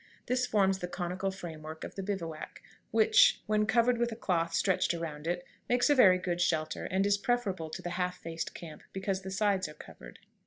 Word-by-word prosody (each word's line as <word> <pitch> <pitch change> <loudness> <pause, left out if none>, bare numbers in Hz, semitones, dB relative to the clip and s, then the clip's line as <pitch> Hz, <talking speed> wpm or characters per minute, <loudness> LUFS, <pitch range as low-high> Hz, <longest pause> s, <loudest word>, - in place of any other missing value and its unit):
This 250 0 0
forms 195 -4 +2
the 180 - -3
conical 180 +2 -3
frame 175 -5 -7
work 155 +1 -8
of - - -7
the 195 - -5
bivouac, 180 -5 -5 0.3
which, 475 +3 +5
when 210 0 +1
covered 240 +1 +3
with 240 0 +1
a - - -4
cloth 170 -6 0
stretched 175 0 +1
around 160 -2 -5
it, 175 +1 -2 0.2
makes 245 +4 +3
a - - +7
very 190 -9 +7
good 175 -1 -2
shelter, 155 -3 0
and 190 +1 +1
is 200 0 +2
preferable 200 -9 -1
to 155 - -7
the 175 - -4
half 180 0 -2
faced 165 0 -5
camp, 160 -3 -9
because 190 0 -2
the 190 - -7
sides 195 -3 +1
are 150 - -11
covered. - - -12
190 Hz, 205 wpm, -31 LUFS, 170-210 Hz, 0.3 s, a